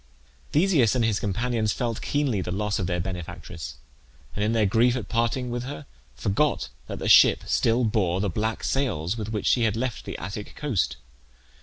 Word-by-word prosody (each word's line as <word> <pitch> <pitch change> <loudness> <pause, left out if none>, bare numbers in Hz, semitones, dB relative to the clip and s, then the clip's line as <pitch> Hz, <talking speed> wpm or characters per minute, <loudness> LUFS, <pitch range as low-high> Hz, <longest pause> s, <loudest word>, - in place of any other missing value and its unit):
Theseus 150 - +3
and 120 -2 +2
his 110 -2 +1
companions 110 +1 0
felt 120 -3 -2
keenly 140 -9 0
the 90 - -4
loss 105 +2 -1
of 90 - -1
their 90 -1 -1
benefactress, 90 -1 -6 0.6
and 105 - -1
in 105 - +1
their 110 -2 +3
grief 120 +5 +3
at 120 -6 -5
parting 120 +2 0
with 120 0 -2
her, 145 +2 -7 0.3
forgot 125 +8 0 0.2
that - - -5
the - - -4
ship - - +7
still 115 +2 +2
bore 100 -5 +1
the 100 - 0
black 110 +4 -2
sails 105 - 0
with 110 -2 -4
which 110 -2 -3
she 125 - +3
had 110 -1 +1
left 125 -2 -3
the - - -5
Attic 100 +4 -7
coast. 135 - 0
110 Hz, 185 wpm, -25 LUFS, 100-125 Hz, 0.6 s, ship